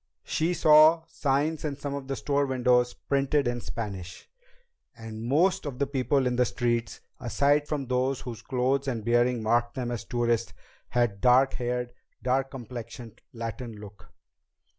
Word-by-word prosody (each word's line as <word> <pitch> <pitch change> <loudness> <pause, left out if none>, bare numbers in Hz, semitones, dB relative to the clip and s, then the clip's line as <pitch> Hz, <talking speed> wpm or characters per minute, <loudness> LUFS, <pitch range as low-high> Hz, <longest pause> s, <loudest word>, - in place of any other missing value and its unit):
She 170 +3 0
saw 155 0 +6
signs 145 0 -1
in 150 -2 -2
some 140 0 -5
of 140 -1 -5
the 135 - -2
store 140 +1 0
windows 125 -1 +2
printed 140 0 0
in 120 0 -2
Spanish, 95 -8 -6 0.7
and 110 -1 -8
most 175 +10 +2
of 135 -3 -5
the 140 - +1
people 135 0 0
in 125 -1 0
the 125 - +4
streets, 120 -2 -1 0.2
aside 145 +4 +2
from 145 -3 -2
those 130 +1 0
whose 115 -3 -7
clothes 130 +3 0
and 115 -5 -3
bearing 120 0 +2
marked 120 +2 +1
them 125 -2 -3
as 120 - -4
tourists, 120 -3 -1 0.4
had 120 -2 +2
a - - -16
dark 130 +4 +4
haired, 125 0 -3 0.3
dark 130 +1 +1
complexioned 120 -3 -9
Latin 115 0 -6
look. 100 -3 -13
125 Hz, 160 wpm, -27 LUFS, 120-140 Hz, 0.7 s, saw